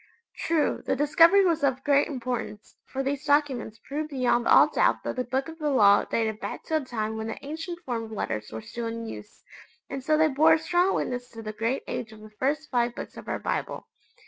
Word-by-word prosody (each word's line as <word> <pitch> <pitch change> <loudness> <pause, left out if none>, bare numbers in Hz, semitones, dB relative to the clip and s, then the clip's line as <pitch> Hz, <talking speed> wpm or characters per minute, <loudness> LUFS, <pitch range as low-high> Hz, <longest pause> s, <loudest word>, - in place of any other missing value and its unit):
True, 325 -2 0
the - - 0
discovery 330 +7 +5
was 330 -4 +1
of 265 -1 +1
great 285 -1 +3
importance, 245 -5 -5
for 270 0 -3
these 280 +1 -2
documents 275 -7 +1
proved 300 +2 -3
beyond 250 -4 +1
all - - +7
doubt - - +1
that - - -3
the 255 - -1
Book 265 +2 -2
of 325 0 -10
the 300 -1 0
Law 205 -7 +5
dated 220 -2 -1
back - - -6
to 315 - 0
a - - -2
time 220 -4 -3
when 220 0 -4
the 225 - -7
ancient 325 +4 -5
form 235 -3 -3
of 220 - -12
letters 110 - -4
were 110 0 -6
still 235 -1 -5
in 230 0 -5
use, 210 -2 -10 0.5
and 270 -1 -4
so 305 +3 +2
they 315 0 +5
bore 310 +3 +5
a - - +5
strong 350 +4 +1
witness 245 0 -3
to 225 -1 -10
the 215 0 -5
great 230 +5 -1
age 225 -2 -4
of 215 -1 -13
the 215 0 -12
first 285 +7 -2
five 240 -1 +1
Books - - -8
of - - -10
our - - -1
Bible. - - -3
260 Hz, 225 wpm, -26 LUFS, 225-300 Hz, 0.5 s, all